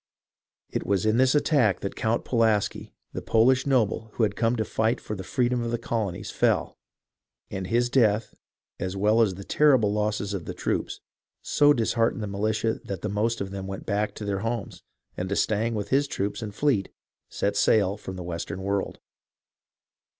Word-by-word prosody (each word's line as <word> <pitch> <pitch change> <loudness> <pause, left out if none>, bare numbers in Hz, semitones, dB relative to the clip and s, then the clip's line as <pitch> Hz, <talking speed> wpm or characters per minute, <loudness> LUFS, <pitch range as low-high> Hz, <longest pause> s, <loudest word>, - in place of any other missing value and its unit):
It - - -2
was 100 -1 0
in 110 +1 +3
this 130 +2 +4
attack 140 - +3
that 100 - -4
Count 110 +1 0
Pulaski, 110 -4 0 0.2
the - - -4
Polish 130 +4 +3
noble 110 -4 +1
who 115 - 0
had 100 -2 +1
come 115 0 +1
to 110 -2 -1
fight 110 +3 0
for 105 - -5
the 95 - -6
freedom 125 +4 0
of 120 - -2
the 120 - 0
colonies, 110 -6 -3
fell, - - +1 0.7
and 95 -2 -4
his 120 +4 +2
death, 110 -4 +2 0.5
as 95 +1 -3
well 105 +3 +3
as 100 -5 +2
the 100 - -8
terrible 130 -6 +3
losses 105 -1 -1
of 95 -4 -4
the - - -6
troops, - - -2 0.4
so 145 0 +4
dis 115 -6 +1
heartened 115 -2 +1
the - - -3
militia 110 +3 -1
that 95 -3 -6
the 105 - -1
most 110 +3 0
of 95 -1 -4
them 95 -1 -5
went 95 0 -6
back 105 0 -1
to 105 - -6
their 100 -1 -1
homes, 115 +3 -4 0.3
and 90 +1 -3
d'Estaing, 110 +3 0
with 100 -1 -3
his 140 +2 +2
troops 100 -2 -3
and 105 -2 -6
fleet, 130 -9 +1 0.4
set 100 0 -1
sail 100 -1 +3
from 95 -2 -8
the 90 - -6
Western 90 +3 -5
world. 100 0 -2
110 Hz, 185 wpm, -26 LUFS, 100-115 Hz, 0.7 s, this